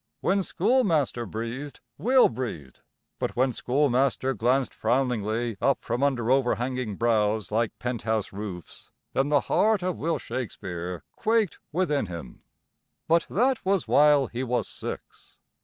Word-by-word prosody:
When 195 +1 +2
Schoolmaster 165 - +1
breathed 115 +7 -5 0.2
Will 255 +3 +5
breathed, 110 - -6 0.4
but - - -2
when 130 +1 +2
Schoolmaster 135 0 +1
glanced 130 +2 +1
frowningly 120 -3 0
up 140 - +2
from 120 +2 -2
under 130 -4 +1
overhanging 125 -3 0
brows 110 -3 +1
like 115 +1 0
penthouse 110 -4 -2
roofs, 95 -4 -8 0.2
then 135 +2 +1
the 145 -1 +4
heart 215 -3 +2
of 180 -2 -1
Will 165 +1 0
Shakespeare 90 -8 -5
quaked 220 -5 +1
within 150 - 0
him. 85 -8 -8 0.7
But 165 +1 +3
that 250 +5 +1
was 190 -2 +1
while 145 -2 +5
he 120 +1 -4
was 120 -4 -1
six. - - -8
125 Hz, 130 wpm, -26 LUFS, 110-150 Hz, 0.7 s, Will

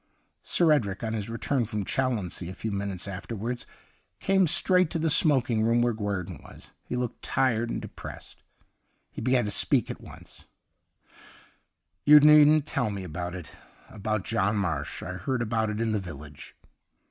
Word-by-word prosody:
Sir 170 -3 +3
Edric, 105 -10 0
on 110 -1 -2
his 110 -1 -4
return 120 +2 -1
from 105 -3 -3
Challonsea 105 -10 -2
a 95 - -8
few 110 - -4
minutes 100 -2 -4
after 100 +4 -6
wards, 120 +4 -5 0.5
came 190 -2 +2
straight 180 +2 +4
to 170 - -2
the 160 -1 +1
smoking 130 -8 +3
room 115 +2 +2
where 120 -1 +1
Guerdon 95 -7 -4
was. - - -14
He - - -6
looked 125 -2 -4
tired 120 -3 0
and - - -3
depressed. - - -10 0.7
He - - -8
began 125 0 +2
to 105 - -3
speak - - +2
at - - -9
once: - - -14 0.8
' 80 +4 -27
You 150 0 +10
needn't 150 0 +6
tell 120 -6 -1
me 100 -2 -5
about 85 +1 -5
it 90 -5 -10 0.2
— - - -27
about 110 -1 -3
John 100 +4 0
Marsh. 80 -7 -3
I 90 - -5
heard 120 +7 -2
about 110 -1 -1
it 105 0 -4
in 115 -1 0
the 105 - 0
village.' 75 -6 -10
110 Hz, 175 wpm, -27 LUFS, 95-130 Hz, 0.8 s, You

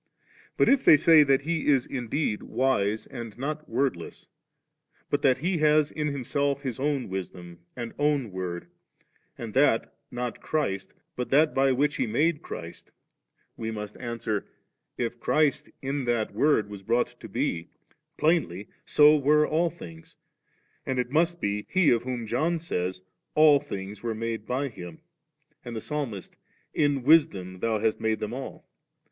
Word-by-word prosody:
But - - +4
if 275 -1 +4
they 155 - +8
say 160 +1 +7
that 135 -2 +3
He 165 +1 -2
is 135 -4 +4
indeed 125 -2 -2
wise 110 -5 0
and 115 -4 -8
not 150 +4 -4
word 130 +1 +1
less, 85 - -11 0.8
but 145 - +1
that 130 -2 +4
He 170 +5 -1
has 150 -1 +3
in 150 -1 -2
Himself 140 0 -1
His 130 -4 -4
own 140 -2 -1
wisdom 90 -2 -7 0.2
and 120 -2 -6
own 145 -6 +1
word, 90 -2 -5 0.7
and 115 -3 -7
that, 130 -4 +3 0.2
not 125 -1 -4
Christ, 100 -12 -2 0.2
but 125 - -3
that 150 +3 +4
by 135 0 +3
which 140 +3 +1
He - - 0
made 150 +8 +1
Christ, 85 0 -9 0.6
we 110 - -4
must 105 -1 -6
answer 115 -4 -3 0.5
that, - - -1
if 120 +1 -6
Clmst 150 +3 +1
in 135 0 -2
that 120 -3 0
wOTd 145 -8 +2
was 100 -1 -9
brought 115 +4 0
to - - -10
be, 85 +1 -2 0.5
plainly 150 - +1
so 150 +1 +6
were 150 +1 +3
all 165 +2 +1
things; 85 - -12 0.7
and 130 - -2
it 125 0 -1
must 170 +3 +2
be 105 -4 -2
He 185 -5 +4
of 115 -2 +3
whom 125 -2 -4
John 155 +10 0
says, 90 - -3 0.2
* - - -53
All 150 -2 +7
things 100 -3 -7
were 115 -2 -3
made 115 -1 -4
by 135 +3 -1
Him,' 110 - -10 0.6
and 120 -1 -7
the - - -2
Psalmist, 125 -7 -5 0.4
'In 145 -3 +1
Wisdom 100 - +3
hast 110 -1 0
Thou - - -13
made 110 0 0
them 110 +2 -4
all*.' 135 +1 -7
125 Hz, 165 wpm, -27 LUFS, 110-150 Hz, 0.8 s, they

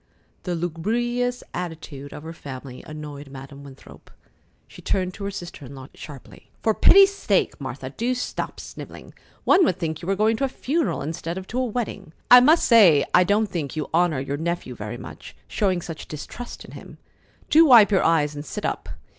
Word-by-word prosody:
The 180 -2 -1
lugubrious 240 +9 -2
attitude 160 -5 -6
of 150 - -9
her 165 +1 -7
family 130 -4 -9
annoyed 150 -2 -8
Madam 135 +1 -11
Winthrop. 135 -1 -14 0.6
She - - -14
turned 185 -1 -1
to 200 - -7
her - - -2
sister 175 -6 -8
in 135 +1 -10
law 130 +1 -10
sharply. 140 -4 -12
"For 220 - +3
pity's 390 - +6
sake, 200 - 0
Martha, 130 0 -6
do 240 - -1
stop 250 - -4
snivelling! - - -10 0.3
One 375 0 +5
would 185 - +1
think 160 -3 -3
you 170 - -8
were 195 - +1
going 215 +2 +2
to 275 - -2
a - - +3
funeral 300 - -1
instead 165 +3 -4
of 190 - -6
to 250 - -2
a 255 - +1
wedding. 210 -7 -4 0.2
I 250 - +12
must 305 +7 +5
say 190 - +6
I 180 - +6
don't 205 +4 +2
think 165 -8 -5
you 155 -2 -4
honor 170 -4 +2
your 140 +2 -3
nephew 170 +3 -3
very - - -6
much, - - -11
showing 185 -5 0
such 165 -3 -8
distrust 155 +10 -8
in - - -13
him. - - -12 0.5
Do 320 +2 +7
wipe 230 -6 +8
your 190 - +3
eyes 150 -3 +2
and 145 0 -6
sit - - -6
up. - - -3
175 Hz, 195 wpm, -23 LUFS, 145-225 Hz, 0.6 s, I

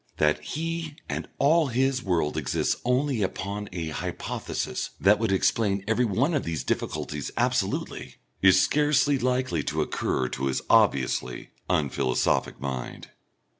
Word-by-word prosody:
That 75 0 +2
he 165 - -4
and - - -4
all 155 +2 +4
his 130 +1 +1
world 85 -7 0
exists - - -1
only 125 -1 +1
upon 100 +2 -3
a 85 -3 -4
hypothesis 75 - -4
that 105 +2 +5
would 115 -2 0
explain 100 0 +1
everyone 120 - +1
of 145 - 0
these 80 -5 -3
difficulties - - -3
absolutely, - - -1 0.3
is 95 -1 +6
scarcely 145 +3 +3
likely 125 -9 0
to - - 0
occur 65 - -1
to 65 +1 -2
his 65 - -1
obviously 65 -2 +2 0.2
unphilosophic 65 -5 +1
mind. 65 -2 -5
105 Hz, 130 wpm, -26 LUFS, -, 0.3 s, is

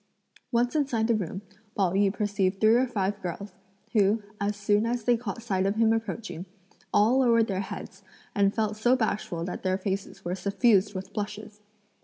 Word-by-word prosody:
Once 245 +3 +1
inside 265 -7 +1
the 230 - +2
room, 195 -2 -3 0.3
Pao 190 -4 +2
yü 195 +1 +3
perceived 200 -2 -1
three 220 +1 +5
or 250 +2 +3
five 205 -3 -2
girls, 185 +3 -5 0.4
who, 210 0 +3 0.2
as 205 +1 -1
soon 205 +2 +2
as 240 -1 -1
they 245 +2 +4
caught 230 -1 -5
sight 195 -4 0
of 200 - 0
him 225 0 +4
approaching, 220 -5 -4 0.4
all 230 +6 +4
lowered 230 -3 +4
their 195 -4 -2
heads, 195 0 -7 0.3
and 200 -1 +3
felt 215 -1 0
so 240 +4 +3
bashful 210 -8 -2
that 180 - -5
their 185 0 0
faces 195 -1 -4
were 175 - -1
suffused 200 +1 +2
with 185 0 -6
blushes. 210 0 -6
210 Hz, 180 wpm, -27 LUFS, 195-225 Hz, 0.4 s, three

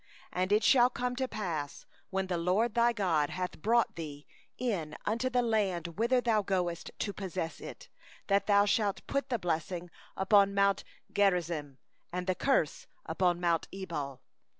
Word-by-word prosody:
29And 185 +2 0
it 210 +1 +4
shall 250 -2 +6
come 250 0 -2
to 260 0 0
pass, 170 - -4 0.2
when 190 -1 -1
the 180 -2 -2
LORD 200 +7 +1
thy 235 0 +4
God 175 -10 +1
shall 180 0 -1
bring 235 +4 +4
thee 150 -3 -7 0.3
into 220 +2 -2
the 250 -1 +2
land 190 -6 -1
whither 245 +3 +3
thou 230 -3 +2
goest 180 -4 -1
to 205 - -2
possess 185 -4 -4
it, - - -9 0.4
that 200 0 +2
thou 205 -1 +5
shalt 205 -1 +1
set 275 0 0
the 245 - +1
blessing 175 -1 -3 0.3
upon 200 0 +4
mount 200 0 +3 0.3
Gerizim, 170 -8 +1 0.3
and 180 +1 -3
the 185 - +1
curse 185 - 0 0.2
upon 175 +1 +1
mount 170 -2 +1
Ebal. 160 -8 -5
190 Hz, 155 wpm, -31 LUFS, 170-220 Hz, 0.4 s, shall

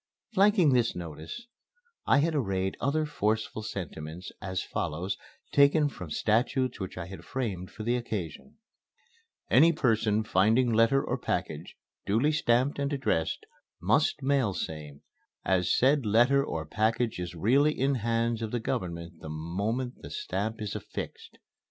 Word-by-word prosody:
Flanking 195 -7 +5
this 120 -2 +2
notice, 85 - -7 0.6
I 140 - +5
had 165 +2 +1
arrayed 95 -9 -1
other 155 +4 +1
forceful 110 -5 -1
sentiments, 85 -3 -6
as 95 -1 -3
follows 90 +5 -3 0.4
taken 145 +1 +5
from 90 - -8
statutes 120 - +1
which 95 -2 -6
I 90 - -4
had 95 +2 -9
framed 100 -9 -3
for 110 - -8
the 120 +2 +1
occasion: 110 - -5 1.0
"Any 165 +1 +7
person 110 -7 +1
finding 110 +5 +3
letter 115 +5 +4
or - - -2
package - - -3 0.3
duly 115 +9 +3
stamped 130 -1 +2
and 140 0 -1
addressed 130 - -1 0.3
must 130 - +2
mail 135 -8 +2
same 75 -2 -6 0.4
as 90 -2 +2
said 140 +2 +4
letter 120 +6 +4
or 80 - -4
package 110 +5 0
is 90 -1 -5
really 135 - +3
in 135 +2 +2
hands 115 0 0
of 110 - -2
the 120 - -1
Government 85 -5 -4
the 80 - -8
moment 100 +11 -3
the - - -8
stamp 115 - -3
is 105 - -4
affixed." - - -7
115 Hz, 145 wpm, -29 LUFS, 95-135 Hz, 1.0 s, Any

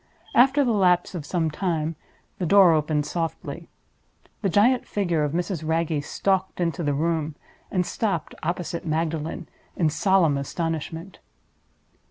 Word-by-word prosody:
After 270 +3 +5
the 240 - +2
lapse 180 -3 +3
of 155 -5 -6
some 165 -3 0
time, 160 -2 -1 0.4
the 180 - -1
door 190 -1 +7
opened 150 -1 +1
softly. 165 0 -4 0.7
The 200 - +1
giant 235 +7 +3
figure 175 -6 0
of 145 0 -1
Mrs. 175 -1 -2
Wragge 160 -2 0
stalked 190 +3 -1
into 170 0 -1
the 145 -3 0
room, 160 0 -1 0.3
and 180 -2 0
stopped 195 -5 -2
opposite 170 -1 -3
Magdalen 160 +1 -2 0.3
in 160 -3 +2
solemn 170 -4 +3
astonishment. 165 +4 -4
170 Hz, 135 wpm, -24 LUFS, 155-190 Hz, 0.7 s, door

